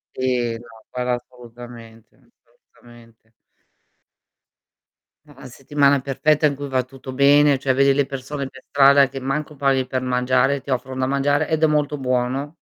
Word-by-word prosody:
Sì. 125 Hz, -2 st, -1 dB
No, 120 Hz, -, -15 dB, 0.2 s
quello 125 Hz, 0 st, -3 dB
assolutamente, 120 Hz, -2 st, -11 dB
assolutamente. 120 Hz, -2 st, -23 dB, 1.9 s
È 150 Hz, -, -19 dB
una 135 Hz, -1 st, -13 dB
settimana 140 Hz, +2 st, +1 dB
perfetta 150 Hz, +3 st, +1 dB
in 140 Hz, -2 st, +1 dB
cui 140 Hz, 0 st, -7 dB
va 130 Hz, -1 st, 0 dB
tutto 130 Hz, +1 st, -11 dB
bene, 140 Hz, +1 st, +4 dB
cioè 130 Hz, -1 st, 0 dB
vedi 140 Hz, +1 st, +3 dB
le 140 Hz, 0 st, +1 dB
persone 135 Hz, +1 st, -6 dB
per 135 Hz, 0 st, -15 dB
strada 140 Hz, -1 st, +5 dB
che 135 Hz, -, -7 dB
manco 145 Hz, +3 st, -4 dB
parli 135 Hz, -2 st, +1 dB
per 130 Hz, 0 st, -3 dB
mangiare, 130 Hz, +2 st, +1 dB
ti 140 Hz, -, -14 dB
offrono 130 Hz, 0 st, -3 dB
da 130 Hz, -, 0 dB
mangiare, 145 Hz, +3 st, 0 dB
ed 160 Hz, 0 st, -1 dB
è -, -, +5 dB
molto 150 Hz, -1 st, 0 dB
buono. 130 Hz, +3 st, -2 dB
135 Hz, 155 wpm, -21 LUFS, 125-140 Hz, 1.9 s, strada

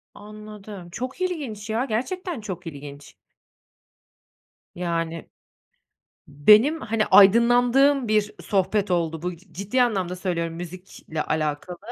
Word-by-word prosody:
Anladım. 210 Hz, -3 st, -11 dB
Çok 255 Hz, -, -6 dB
ilginç 265 Hz, -, -4 dB
ya, 230 Hz, +4 st, 0 dB
gerçekten 310 Hz, -, -3 dB
çok 185 Hz, -4 st, -7 dB
ilginç. 145 Hz, -2 st, -10 dB, 1.6 s
Yani 165 Hz, -2 st, -3 dB, 1.0 s
benim, 215 Hz, -, +5 dB
hani, 225 Hz, -4 st, -1 dB
aydınlandığım 245 Hz, +6 st, +5 dB
bir 210 Hz, -1 st, +1 dB
sohbet 200 Hz, 0 st, 0 dB
oldu 165 Hz, -2 st, -1 dB
bu, 180 Hz, -1 st, -3 dB
c 180 Hz, +1 st, -23 dB
ciddi 205 Hz, +8 st, 0 dB
anlamda 190 Hz, -7 st, -1 dB
söylüyorum, 170 Hz, -3 st, -3 dB
müzikle 175 Hz, -2 st, -7 dB
alakalı. 155 Hz, +3 st, -3 dB
200 Hz, 105 wpm, -24 LUFS, 170-235 Hz, 1.6 s, benim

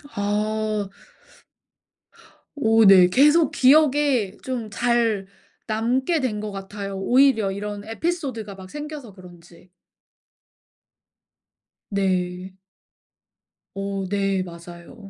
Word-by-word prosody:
아 210 Hz, 0 st, -1 dB, 1.7 s
오 225 Hz, -5 st, +3 dB
네 185 Hz, -2 st, +8 dB
계속 295 Hz, -, +4 dB
기억에 275 Hz, -6 st, +3 dB
좀 245 Hz, -4 st, -4 dB
잘 230 Hz, -2 st, 0 dB, 0.4 s
남게 250 Hz, +9 st, 0 dB
된 230 Hz, -6 st, -2 dB
것 210 Hz, -1 st, -5 dB
같아요 195 Hz, 0 st, -7 dB
오히려 225 Hz, -1 st, +3 dB
이런 205 Hz, +1 st, -6 dB
에피소드가 230 Hz, -, -4 dB
막 190 Hz, -1 st, -12 dB
생겨서 295 Hz, -6 st, -8 dB
그런지. 175 Hz, -1 st, -17 dB, 2.2 s
네. 185 Hz, -2 st, -2 dB, 1.2 s
오 195 Hz, -1 st, -3 dB
네 195 Hz, -1 st, 0 dB
맞아요. 175 Hz, +5 st, -12 dB
210 Hz, 160 characters per minute, -23 LUFS, 195-255 Hz, 2.2 s, 네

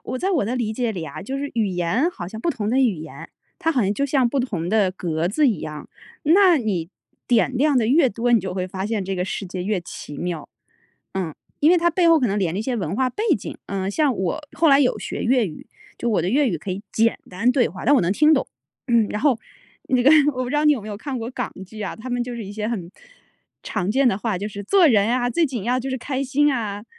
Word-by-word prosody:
我 255 Hz, +1 st, -4 dB
在 385 Hz, -, 0 dB
我 320 Hz, -, +1 dB
的 240 Hz, +5 st, -2 dB
理 220 Hz, -3 st, -1 dB
解 235 Hz, -1 st, -1 dB
里 170 Hz, -4 st, -5 dB
啊， -, -, -8 dB
就 265 Hz, +7 st, -4 dB
是 285 Hz, 0 st, -4 dB
语 225 Hz, -3 st, +1 dB
言 185 Hz, -, 0 dB
好 175 Hz, -, -7 dB
像 220 Hz, +2 st, -8 dB
不 340 Hz, -, 0 dB
同 215 Hz, -8 st, -3 dB
的 255 Hz, -, +2 dB
语 245 Hz, -6 st, +3 dB
言， 155 Hz, 0 st, -9 dB, 0.3 s
它 325 Hz, -3 st, +1 dB
好 255 Hz, -, +2 dB
像 200 Hz, 0 st, +1 dB
就 280 Hz, +6 st, -1 dB
像 265 Hz, -3 st, +2 dB
不 270 Hz, +2 st, 0 dB
同 185 Hz, -9 st, -3 dB
的 205 Hz, -3 st, +2 dB
格 170 Hz, -2 st, -2 dB
子 290 Hz, +8 st, +2 dB
一 205 Hz, -9 st, -1 dB
样。 150 Hz, -1 st, -7 dB, 0.3 s
那 360 Hz, +2 st, +5 dB
你 190 Hz, -8 st, -2 dB, 0.4 s
点 245 Hz, +2 st, +2 dB
亮 290 Hz, +1 st, +3 dB
得 220 Hz, -, +1 dB
越 275 Hz, +2 st, +4 dB
多， 240 Hz, +3 st, -1 dB
你 230 Hz, -, +5 dB
就 185 Hz, 0 st, -5 dB
会 185 Hz, -1 st, -2 dB
发 190 Hz, +2 st, -4 dB
现 215 Hz, -3 st, -2 dB
这 195 Hz, -, -3 dB
个 180 Hz, -, -1 dB
世 195 Hz, +1 st, -4 dB
界 180 Hz, 0 st, -5 dB
越 200 Hz, -1 st, -1 dB
奇 145 Hz, -3 st, -9 dB
妙。 170 Hz, -2 st, -4 dB, 0.7 s
嗯， 180 Hz, -5 st, -3 dB, 0.3 s
因 300 Hz, -, +5 dB
为 360 Hz, -, +6 dB
它 345 Hz, +1 st, +2 dB
背 340 Hz, 0 st, +3 dB
后 330 Hz, -1 st, +6 dB
可 250 Hz, -, +2 dB
能 205 Hz, -1 st, 0 dB
连 180 Hz, -4 st, 0 dB
着 -, -, -2 dB
一 -, -, -2 dB
些 250 Hz, +1 st, -2 dB
文 190 Hz, -2 st, -3 dB
化 260 Hz, -1 st, +1 dB
背 420 Hz, -, -4 dB, 0.2 s
景。 -, -, -7 dB
呃， 195 Hz, 0 st, -2 dB
像 280 Hz, 0 st, +1 dB
我 190 Hz, -, -2 dB, 0.2 s
后 325 Hz, 0 st, +4 dB
来 275 Hz, 0 st, +6 dB
有 250 Hz, -5 st, +2 dB
学 -, -, -5 dB
粤 245 Hz, -3 st, +2 dB
语， 155 Hz, -, -10 dB, 0.3 s
就 240 Hz, -, -1 dB
我 195 Hz, -, +1 dB
的 180 Hz, -, -1 dB
粤 275 Hz, +1 st, +3 dB
语 175 Hz, -, -1 dB
可 190 Hz, -, -6 dB
以 190 Hz, +2 st, -4 dB
简 230 Hz, +1 st, +2 dB
单 205 Hz, +7 st, +1 dB
对 250 Hz, -2 st, +2 dB
话， 185 Hz, -, -9 dB
但 285 Hz, -, +5 dB
我 270 Hz, -, +5 dB
能 175 Hz, +1 st, +1 dB
听 305 Hz, +8 st, +4 dB
懂。 265 Hz, -, 0 dB, 0.4 s
嗯， 235 Hz, -3 st, +3 dB
然 210 Hz, -, -3 dB
后， 270 Hz, -5 st, +3 dB, 0.5 s
那 255 Hz, -1 st, +2 dB
个 275 Hz, -, +6 dB, 0.2 s
我 255 Hz, -, -2 dB
不 245 Hz, -, -5 dB
知 295 Hz, -, 0 dB
道 300 Hz, -, +2 dB
你 300 Hz, -, +6 dB
有 255 Hz, -, -2 dB
没 215 Hz, -, -8 dB
有 205 Hz, -, -5 dB
看 260 Hz, +3 st, -5 dB
过 230 Hz, +2 st, -5 dB
港 -, -, -4 dB
剧 215 Hz, +2 st, -11 dB
啊， 200 Hz, -, -4 dB
他 250 Hz, +3 st, -8 dB
们 245 Hz, 0 st, 0 dB
就 245 Hz, 0 st, -5 dB
是 230 Hz, -, -6 dB
一 200 Hz, -, -8 dB
些 210 Hz, 0 st, -3 dB
很， 185 Hz, -7 st, -4 dB, 0.7 s
常 180 Hz, +3 st, -2 dB
见 265 Hz, +2 st, +3 dB
的 195 Hz, -4 st, 0 dB
话： 215 Hz, -4 st, -1 dB
“就 205 Hz, +3 st, -4 dB
是 205 Hz, -1 st, -7 dB
做 370 Hz, -, +5 dB
人 215 Hz, -6 st, +4 dB
啊， 245 Hz, 0 st, +1 dB
最 335 Hz, +2 st, +2 dB
紧 245 Hz, -7 st, -5 dB
要 250 Hz, +2 st, +1 dB
就 270 Hz, -, -5 dB
是 260 Hz, -, -1 dB
开 265 Hz, +2 st, -3 dB
心 290 Hz, +3 st, +2 dB
啊。” 210 Hz, -3 st, -4 dB
230 Hz, 295 characters per minute, -22 LUFS, 195-265 Hz, 0.7 s, 为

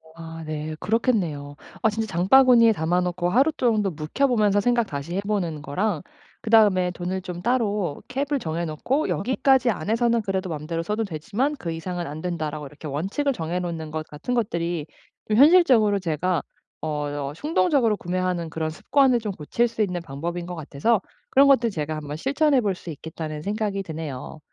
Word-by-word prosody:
아 165 Hz, 0 st, -8 dB
네 155 Hz, 0 st, -4 dB
그렇겠네요. 180 Hz, -, 0 dB, 0.3 s
아 220 Hz, -, +4 dB
진짜 220 Hz, +1 st, -2 dB
장바구니에 230 Hz, +6 st, +6 dB
담아 175 Hz, 0 st, +1 dB
놓고 180 Hz, 0 st, -1 dB
하루 265 Hz, -, +4 dB
정도 220 Hz, -9 st, +1 dB
묵혀 160 Hz, -, 0 dB
보면서 210 Hz, -5 st, +3 dB
생각 240 Hz, +2 st, +2 dB
다시 145 Hz, +3 st, -5 dB
해 195 Hz, -, 0 dB
보는 190 Hz, -7 st, -2 dB
거랑 175 Hz, +5 st, -1 dB, 0.4 s
그다음에 205 Hz, -5 st, +4 dB
돈을 180 Hz, +1 st, -4 dB
좀 180 Hz, -2 st, -6 dB
따로 210 Hz, -, 0 dB
cap을 280 Hz, +2 st, -1 dB
정해 170 Hz, -4 st, -3 dB
놓고 240 Hz, -, -1 dB
'여기까지 260 Hz, +3 st, +2 dB
안에서는 230 Hz, +5 st, +1 dB
그래도 190 Hz, -2 st, -2 dB
맘대로 165 Hz, +1 st, -3 dB
써도 210 Hz, +5 st, -1 dB
되지만 215 Hz, -, -2 dB
그 170 Hz, -9 st, -4 dB
이상은 175 Hz, +1 st, -4 dB
안된다.'라고 155 Hz, -1 st, -4 dB
이렇게 150 Hz, +3 st, -10 dB
원칙을 195 Hz, -, -1 dB
정해 170 Hz, -4 st, -3 dB
놓는 165 Hz, -3 st, -4 dB
것 155 Hz, 0 st, -4 dB
같은 150 Hz, +12 st, -5 dB
것들이 170 Hz, -8 st, -1 dB, 0.4 s
좀 215 Hz, -, +1 dB
현실적으로 260 Hz, -, +6 dB
제가 170 Hz, 0 st, 0 dB, 0.4 s
어 -, -, -3 dB, 0.4 s
어 -, -, -8 dB
충동적으로 285 Hz, -, +2 dB
구매하는 180 Hz, -2 st, -2 dB
그런 160 Hz, 0 st, -2 dB
습관을 255 Hz, -, +2 dB
좀 215 Hz, -2 st, -3 dB
고칠 190 Hz, +9 st, 0 dB
수 230 Hz, -1 st, -4 dB
있는 180 Hz, -4 st, 0 dB
방법인 170 Hz, +4 st, -5 dB
것 180 Hz, 0 st, -6 dB
같아서 160 Hz, +8 st, 0 dB, 0.3 s
그런 275 Hz, +1 st, +6 dB
것들 245 Hz, -4 st, +4 dB
제가 155 Hz, -4 st, -3 dB
'한번 150 Hz, -1 st, -5 dB
실천해 280 Hz, -, +2 dB
볼 205 Hz, -4 st, 0 dB
수 180 Hz, -, -10 dB
있겠다.'는 155 Hz, 0 st, -6 dB
생각이 205 Hz, +1 st, -2 dB
드네요. 155 Hz, -4 st, -6 dB
185 Hz, 385 characters per minute, -24 LUFS, 160-230 Hz, 0.4 s, 장바구니에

